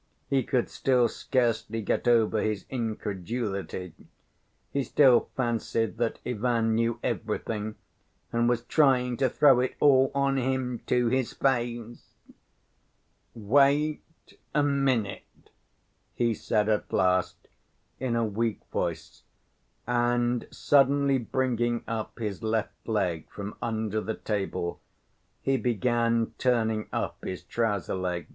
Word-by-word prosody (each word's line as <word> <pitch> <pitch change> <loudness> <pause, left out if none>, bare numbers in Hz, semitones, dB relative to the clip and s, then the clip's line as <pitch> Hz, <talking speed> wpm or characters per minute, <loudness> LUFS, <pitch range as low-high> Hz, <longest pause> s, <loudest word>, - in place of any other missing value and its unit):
He 135 -1 +3
could 125 -1 0
still 125 -3 +2
scarcely 115 -4 -1
get 110 - -1
over 115 -2 +3
his 110 -2 -2
incredulity; 105 -5 -3 0.8
he 140 - 0
still 130 -3 +4
fancied 115 -2 -1
that 120 -1 -1
Ivan 115 -1 0
knew 115 +1 0
everything 110 0 -3 0.6
and 120 0 +2
was 120 -1 0
trying 125 -3 +3
to 130 -1 +2
"throw 135 0 +5
it 125 +1 -1
all 135 -2 +5
on 140 -1 +2
him 130 -2 -1
to 125 -1 +2
his 130 0 0
face." 120 -3 -2 1.2
"Wait 140 +7 +3 0.5
a 150 - +4
minute," 135 -7 -1 0.6
he 120 -1 +1
said 105 0 0
at 105 -1 0
last 90 0 +1 0.5
in 130 -3 -1
a 115 -1 +1
weak 110 +1 -1
voice, 80 -4 -3 0.6
and 120 0 +1
suddenly 140 -1 +3
bringing 120 -1 -1
up 115 -1 -4
his 105 -3 -4
left 110 -1 -2
leg 95 -8 -1
from 100 0 -7
under 110 -2 -1
the 110 - -3
table, 95 -4 -3 0.6
he 135 0 +2
began 115 -1 +1
turning 110 -4 +1
up - - -3
his 95 -1 -5
trouser 105 0 -1
leg. 90 -3 -3
115 Hz, 120 wpm, -27 LUFS, 110-130 Hz, 1.2 s, throw